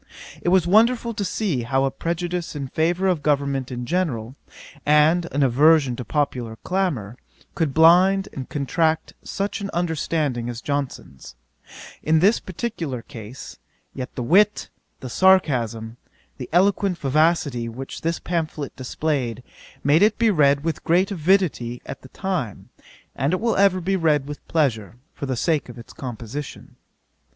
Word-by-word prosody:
It -, -, 0 dB
was 185 Hz, -2 st, +4 dB
wonderful 230 Hz, +5 st, +3 dB
to 205 Hz, -, -3 dB
see 190 Hz, -, -1 dB
how 135 Hz, +3 st, 0 dB
a 135 Hz, -, 0 dB
prejudice 175 Hz, 0 st, -3 dB
in 140 Hz, -3 st, -5 dB
favour 175 Hz, +6 st, 0 dB
of 180 Hz, -5 st, +1 dB
government 140 Hz, -3 st, 0 dB
in 125 Hz, -1 st, -4 dB
general, 130 Hz, -7 st, -2 dB, 0.5 s
and 155 Hz, +4 st, +4 dB
an 145 Hz, +1 st, +1 dB
aversion 140 Hz, +1 st, +4 dB
to 125 Hz, -, -5 dB
popular 125 Hz, -6 st, -2 dB
clamour, 150 Hz, -, -2 dB, 0.4 s
could 160 Hz, -4 st, 0 dB
blind 180 Hz, +6 st, +5 dB
and 130 Hz, -2 st, -7 dB
contract 160 Hz, +2 st, 0 dB
such 200 Hz, +1 st, -4 dB
an 200 Hz, -, -4 dB
understanding 155 Hz, -7 st, -1 dB
as 120 Hz, -2 st, -5 dB
Johnson's, 140 Hz, -, -5 dB, 0.7 s
in 160 Hz, +1 st, +2 dB
this 200 Hz, +8 st, +4 dB
particular 170 Hz, -, -5 dB
case; 120 Hz, -2 st, -10 dB, 0.3 s
yet 130 Hz, -2 st, -7 dB
the 125 Hz, -, -3 dB
wit, 205 Hz, -, +3 dB, 0.3 s
the 130 Hz, -, -6 dB
sarcasm, 120 Hz, -, +2 dB, 0.4 s
the 125 Hz, -, -6 dB
eloquent 190 Hz, +1 st, +2 dB
vivacity 145 Hz, -5 st, +1 dB
which 130 Hz, +4 st, -8 dB
this 165 Hz, +1 st, -1 dB
pamphlet 155 Hz, -5 st, -3 dB
displayed, 130 Hz, -3 st, -2 dB, 0.4 s
made 145 Hz, +5 st, +4 dB
it 210 Hz, +1 st, +4 dB
be 230 Hz, -1 st, +3 dB
read 140 Hz, -5 st, +3 dB
with 165 Hz, -1 st, -3 dB
great 180 Hz, +4 st, +2 dB
avidity 165 Hz, -9 st, +1 dB
at -, -, -8 dB
the 130 Hz, -, -14 dB
time, 180 Hz, -, -4 dB, 0.5 s
and 140 Hz, +6 st, 0 dB
it 185 Hz, -, +1 dB
will 230 Hz, 0 st, 0 dB
ever 195 Hz, -1 st, +4 dB
be 190 Hz, +2 st, -1 dB
read 155 Hz, -6 st, +2 dB
with 145 Hz, 0 st, -9 dB
pleasure, 120 Hz, -, 0 dB, 0.2 s
for 140 Hz, -, -6 dB
the 130 Hz, -2 st, -2 dB
sake 155 Hz, -1 st, 0 dB
of 120 Hz, -, -10 dB
its 115 Hz, -, -12 dB
composition. 125 Hz, +3 st, -7 dB
150 Hz, 150 wpm, -23 LUFS, 130-180 Hz, 0.7 s, blind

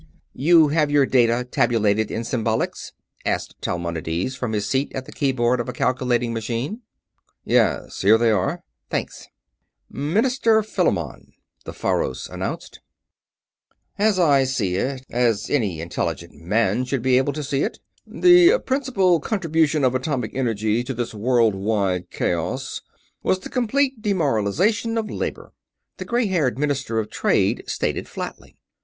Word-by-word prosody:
"You 160 Hz, +2 st, +5 dB
have 150 Hz, 0 st, +2 dB
your 145 Hz, -1 st, +4 dB
data 120 Hz, -2 st, +2 dB
tabulated 110 Hz, -2 st, +2 dB
in 115 Hz, -, -3 dB
symbolics?" 115 Hz, -2 st, -2 dB, 0.3 s
asked -, -, -3 dB
Talmonides, 85 Hz, +5 st, -3 dB
from 125 Hz, -3 st, -3 dB
his 105 Hz, -1 st, -1 dB
seat 135 Hz, +6 st, -1 dB
at 130 Hz, -1 st, -4 dB
the -, -, -11 dB
keyboard 125 Hz, -3 st, +1 dB
of 120 Hz, -, -3 dB
a -, -, -4 dB
calculating 125 Hz, -1 st, 0 dB
machine. 120 Hz, -, -3 dB, 0.6 s
"Yes. -, -, +1 dB
Here 105 Hz, +3 st, +6 dB
they 115 Hz, 0 st, +3 dB
are." 100 Hz, -4 st, -1 dB, 0.3 s
"Thanks." -, -, -4 dB, 0.6 s
"Minister 220 Hz, -, +2 dB
Philamon," 215 Hz, -, -2 dB, 0.3 s
the -, -, -6 dB
Faros -, -, -2 dB
announced. -, -, -6 dB, 1.2 s
"As 210 Hz, -1 st, +3 dB
I 145 Hz, -6 st, +4 dB
see 115 Hz, -9 st, -1 dB
it 130 Hz, +4 st, -3 dB
as 115 Hz, -3 st, 0 dB
any 105 Hz, -, 0 dB
intelligent 85 Hz, +1 st, -4 dB
man 105 Hz, +10 st, 0 dB
should 130 Hz, -2 st, -2 dB
be 130 Hz, -1 st, +4 dB
able 140 Hz, +2 st, 0 dB
to 150 Hz, +1 st, -4 dB
see 140 Hz, 0 st, -1 dB
it -, -, -2 dB, 0.3 s
the 355 Hz, +4 st, +6 dB
principal 245 Hz, -, +2 dB
contribution 160 Hz, -5 st, 0 dB
of 130 Hz, -1 st, +3 dB
atomic 130 Hz, 0 st, -2 dB
energy 115 Hz, -3 st, 0 dB
to 130 Hz, +1 st, -5 dB
this 120 Hz, -1 st, -3 dB
worldwide 105 Hz, -5 st, +1 dB
chaos -, -, -2 dB, 0.4 s
was 185 Hz, -, +1 dB
the -, -, -8 dB
complete 260 Hz, 0 st, 0 dB
demoralization 190 Hz, -, +1 dB
of 220 Hz, -1 st, -2 dB
labor," -, -, -5 dB, 0.4 s
the -, -, -6 dB
gray 240 Hz, 0 st, +1 dB
haired 160 Hz, -, 0 dB
Minister 135 Hz, -5 st, -1 dB
of 110 Hz, -1 st, -2 dB
Trade -, -, +1 dB
stated, -, -, -2 dB
flatly. -, -, -8 dB
130 Hz, 140 wpm, -22 LUFS, 115-165 Hz, 1.2 s, Here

